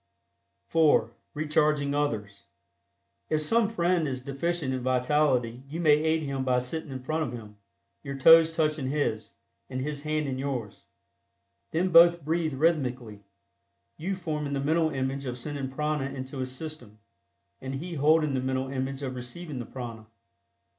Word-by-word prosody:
(4) 150 Hz, -8 st, +4 dB, 0.2 s
RECHARGING 150 Hz, -1 st, +1 dB
OTHERS. 110 Hz, -9 st, -2 dB, 0.8 s
If 155 Hz, -1 st, +1 dB
some 225 Hz, +6 st, +2 dB
friend 175 Hz, -6 st, +1 dB
is 130 Hz, -2 st, -4 dB
deficient 140 Hz, +1 st, -2 dB
in 130 Hz, -, -2 dB
vitality 125 Hz, -1 st, +1 dB
you 160 Hz, +4 st, -5 dB
may 155 Hz, -3 st, +5 dB
aid 160 Hz, +1 st, +1 dB
him 135 Hz, -2 st, -2 dB
by 130 Hz, -1 st, +2 dB
sitting 145 Hz, +5 st, -3 dB
in 130 Hz, -1 st, -6 dB
front 155 Hz, +4 st, -1 dB
of 130 Hz, -6 st, -2 dB
him, 105 Hz, -3 st, -9 dB, 0.4 s
your 140 Hz, -1 st, -6 dB
toes 165 Hz, +3 st, +7 dB
touching 155 Hz, -4 st, 0 dB
his, 115 Hz, -7 st, -2 dB, 0.4 s
and 130 Hz, -1 st, -4 dB
his 145 Hz, +2 st, -3 dB
hands 155 Hz, 0 st, -1 dB
in 130 Hz, -1 st, -3 dB
yours. 130 Hz, -7 st, -4 dB, 0.8 s
Then 175 Hz, +3 st, 0 dB
both 170 Hz, -2 st, +6 dB
breathe 160 Hz, -2 st, 0 dB
rhythmically, 130 Hz, -8 st, 0 dB, 0.7 s
you 190 Hz, +5 st, -3 dB
forming 150 Hz, -5 st, -3 dB
the 140 Hz, -, 0 dB
mental 160 Hz, +3 st, +2 dB
image 135 Hz, -1 st, -3 dB
of 125 Hz, 0 st, -4 dB
sending 140 Hz, +1 st, -4 dB
prana 150 Hz, +1 st, -1 dB
into 130 Hz, 0 st, -6 dB
his 130 Hz, 0 st, -3 dB
system, 130 Hz, -6 st, -8 dB, 0.6 s
and 135 Hz, +1 st, -4 dB
he 170 Hz, +6 st, -5 dB
holding 155 Hz, 0 st, +3 dB
the 130 Hz, -, +1 dB
mental 130 Hz, 0 st, -1 dB
image 135 Hz, +1 st, -3 dB
of 130 Hz, -1 st, -3 dB
receiving 130 Hz, +4 st, -6 dB
the 120 Hz, -, -6 dB
prana. 115 Hz, -4 st, -8 dB
140 Hz, 155 wpm, -28 LUFS, 130-155 Hz, 0.8 s, toes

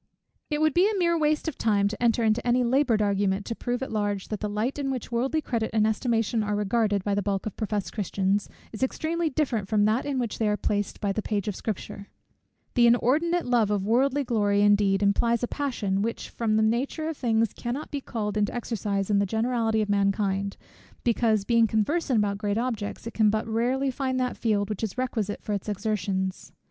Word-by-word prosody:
It 300 Hz, -1 st, -1 dB
would 310 Hz, -2 st, +3 dB
be 380 Hz, +5 st, +4 dB
mere 340 Hz, -2 st, +2 dB
waste 305 Hz, 0 st, +1 dB
of 315 Hz, -, -4 dB
time 205 Hz, -3 st, +2 dB
to 215 Hz, +3 st, -5 dB
enter 235 Hz, -1 st, +2 dB
into 220 Hz, +1 st, +2 dB
any 245 Hz, +1 st, +3 dB
laboured 245 Hz, -3 st, +2 dB
argument 200 Hz, -1 st, 0 dB
to 230 Hz, -, -4 dB
prove 245 Hz, +2 st, -2 dB
at -, -, -5 dB
large, 205 Hz, -2 st, -2 dB
that 215 Hz, -, -3 dB
the 210 Hz, -, -3 dB
light 220 Hz, +7 st, -2 dB
in 275 Hz, -1 st, -1 dB
which 255 Hz, -3 st, -4 dB
worldly 265 Hz, +6 st, 0 dB
credit 225 Hz, -3 st, -1 dB
and 215 Hz, -1 st, +3 dB
estimation 225 Hz, 0 st, +1 dB
are 210 Hz, 0 st, -1 dB
regarded, 205 Hz, -1 st, +1 dB
by 205 Hz, -, 0 dB
the 205 Hz, -, +1 dB
bulk 195 Hz, -1 st, -2 dB
of 215 Hz, -, -4 dB
professed 210 Hz, -3 st, -3 dB
Christians, 195 Hz, -1 st, -1 dB, 0.2 s
is 215 Hz, -, -8 dB
extremely 320 Hz, +5 st, 0 dB
different 255 Hz, -8 st, -1 dB
from 205 Hz, 0 st, +2 dB
that 220 Hz, +6 st, +1 dB
in 280 Hz, -2 st, -1 dB
which 240 Hz, -4 st, -2 dB
they 220 Hz, -, +2 dB
are 210 Hz, 0 st, +1 dB
placed 205 Hz, -1 st, -2 dB
by 200 Hz, -2 st, 0 dB
the 215 Hz, -, -2 dB
page 205 Hz, -2 st, -2 dB
of 205 Hz, -, -2 dB
Scripture. 200 Hz, -1 st, -5 dB, 0.7 s
The 240 Hz, -2 st, +5 dB
inordinate 310 Hz, +9 st, +2 dB
love 240 Hz, -4 st, +2 dB
of 205 Hz, -2 st, 0 dB
worldly 270 Hz, +6 st, +2 dB
glory 205 Hz, -5 st, +2 dB
indeed, 205 Hz, -1 st, +3 dB
implies 230 Hz, +4 st, +2 dB
a -, -, +1 dB
passion, 225 Hz, -10 st, -1 dB
which 230 Hz, +2 st, -3 dB
from 220 Hz, -2 st, 0 dB
the 220 Hz, -, +3 dB
nature 255 Hz, +8 st, 0 dB
of 320 Hz, -, -3 dB
things 225 Hz, -4 st, +1 dB
cannot 255 Hz, +5 st, -5 dB
be 285 Hz, -, -3 dB
called 210 Hz, -4 st, -3 dB
into 205 Hz, +2 st, 0 dB
exercise 210 Hz, -4 st, -2 dB
in 200 Hz, -, +4 dB
the 200 Hz, -, +1 dB
generality 225 Hz, 0 st, +1 dB
of -, -, -4 dB
mankind, 200 Hz, -1 st, 0 dB, 0.5 s
because, 225 Hz, -3 st, +2 dB
being 230 Hz, 0 st, +4 dB
conversant 255 Hz, +5 st, +1 dB
about 200 Hz, -1 st, 0 dB
great 205 Hz, -1 st, -1 dB
objects, 230 Hz, -4 st, -3 dB
it 230 Hz, -, -6 dB
can 215 Hz, -2 st, +4 dB
but 215 Hz, +1 st, -1 dB
rarely 250 Hz, +4 st, 0 dB
find 260 Hz, 0 st, -2 dB
that 250 Hz, -1 st, -1 dB
field 205 Hz, -3 st, 0 dB
which 210 Hz, -2 st, -4 dB
is 220 Hz, +2 st, -3 dB
requisite 225 Hz, -5 st, -2 dB
for 210 Hz, -, -2 dB
its 200 Hz, +1 st, -3 dB
exertions. 200 Hz, -2 st, -2 dB
220 Hz, 210 wpm, -26 LUFS, 205-250 Hz, 0.7 s, The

